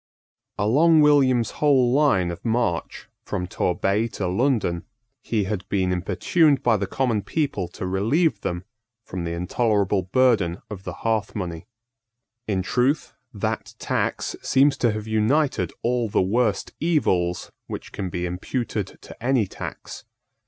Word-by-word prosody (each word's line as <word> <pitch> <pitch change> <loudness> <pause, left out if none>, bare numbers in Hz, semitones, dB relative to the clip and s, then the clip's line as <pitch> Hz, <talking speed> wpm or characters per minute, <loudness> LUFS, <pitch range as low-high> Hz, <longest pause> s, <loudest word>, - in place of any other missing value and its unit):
Along 155 +10 +4
William's 135 -6 +4
whole 135 -5 +3
line 130 -12 +3
of 85 - -8
march, 115 -7 -1 0.2
from 90 - -3
Torbay 95 +5 0
to 95 - -1
London, 100 -4 +1 0.4
he 110 -3 0
had 95 0 -4
been 95 -2 +1
importuned 140 - +2
by 120 -2 +4
the 100 0 -2
common 120 -1 0
people 135 - -2
to - - -7
relieve 110 - +1
them 85 0 -3 0.4
from 90 -4 -5
the 85 - -3
intolerable 100 +2 +1
burden 100 -3 +2
of 95 -2 -7
the - - -4
hearth 110 -2 0
money. 85 -5 -5 0.8
In 95 -3 0
truth, 130 - 0 0.2
that - - -3
tax - - -2
seems 135 +1 +3
to 120 - +2
have 105 0 -4
united 115 +7 +1
all 120 -1 +1
the - - +1
worst 105 +2 +1
evils 90 - +1 0.2
which - - -7
can 95 -3 -4
be 90 0 -3
imputed 100 +3 -3
to - - -12
any 125 -3 +2
tax. - - -8
110 Hz, 140 wpm, -24 LUFS, 95-130 Hz, 0.8 s, Along